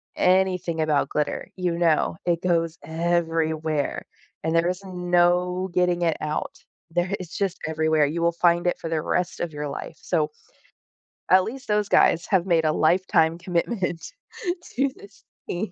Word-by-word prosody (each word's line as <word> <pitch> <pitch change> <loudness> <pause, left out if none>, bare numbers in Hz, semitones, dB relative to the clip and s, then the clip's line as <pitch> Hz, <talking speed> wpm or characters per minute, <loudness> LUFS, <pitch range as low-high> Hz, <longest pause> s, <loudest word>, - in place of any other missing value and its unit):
anything 180 -3 +2
about 155 -2 +1
glitter, 150 -1 -2
you 180 -2 -1
know 165 -1 +2
it 170 -1 +1
goes 165 -2 0
everywhere, 160 -2 -1 0.4
and 160 +1 0
there 165 +1 +3
is 180 +1 -3
no 180 0 +1
getting 180 -1 +2
it 165 -2 +1
out. 155 0 -3 0.3
There 175 +3 0
it's 175 -2 -7
just 195 -2 -1
everywhere, 160 -1 +2
you 170 +3 -3
will 170 - +4
find 170 0 +2
it - - 0
for 165 - -5
the 160 -2 0
rest 180 - -1
of 170 -3 -3
your 150 -1 -4
life - - -7
so, 155 -4 0 1.0
at 185 0 +6
least 265 +4 -7
those 210 -1 +2
guys 170 +1 +4
have 190 -2 +2
made 165 -3 +2
a 155 - +2
lifetime 165 -1 +3
commitment 175 0 -2 0.6
to 275 +2 +1
this 200 0 -16 0.3
team. 180 +2 -3
170 Hz, 160 wpm, -24 LUFS, 160-180 Hz, 1.0 s, at